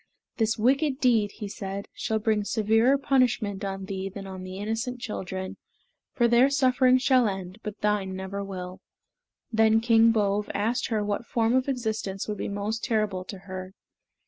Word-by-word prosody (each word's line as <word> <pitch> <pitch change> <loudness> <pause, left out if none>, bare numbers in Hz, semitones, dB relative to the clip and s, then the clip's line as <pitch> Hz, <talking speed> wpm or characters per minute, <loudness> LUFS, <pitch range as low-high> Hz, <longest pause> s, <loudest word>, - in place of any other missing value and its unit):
"This 225 -1 +1
wicked 265 +4 +2
deed," 225 -6 +3
he 210 - -6
said, 195 0 -6
"shall 220 - -1
bring 215 -1 +1
severer 225 +5 +3
punishment 245 -8 +1
on 195 -1 -4
thee 190 0 -4
than 195 +1 -8
on 190 -1 -7
the 185 0 -7
innocent 225 +4 -3
children, 190 -4 -5 0.5
for 240 -2 +2
their 240 +3 +5
suffering 255 -2 +4
shall 255 -2 +3
end, 190 0 -5
but 210 -1 -7
thine 205 -3 0
never 190 +1 -5
shall." 185 -2 -7 0.7
Then 220 0 +4
King 230 0 +5
Bove 210 -1 0
asked 225 +5 0
her 215 -3 0
what 205 +3 -2
form 230 0 +1
of 260 +1 +2
existence 220 -6 -2
would 210 -1 -4
be - - -3
most 205 +2 -3
terrible 210 -5 0
to 195 - -7
her. 185 0 -7
215 Hz, 170 wpm, -26 LUFS, 195-235 Hz, 0.7 s, their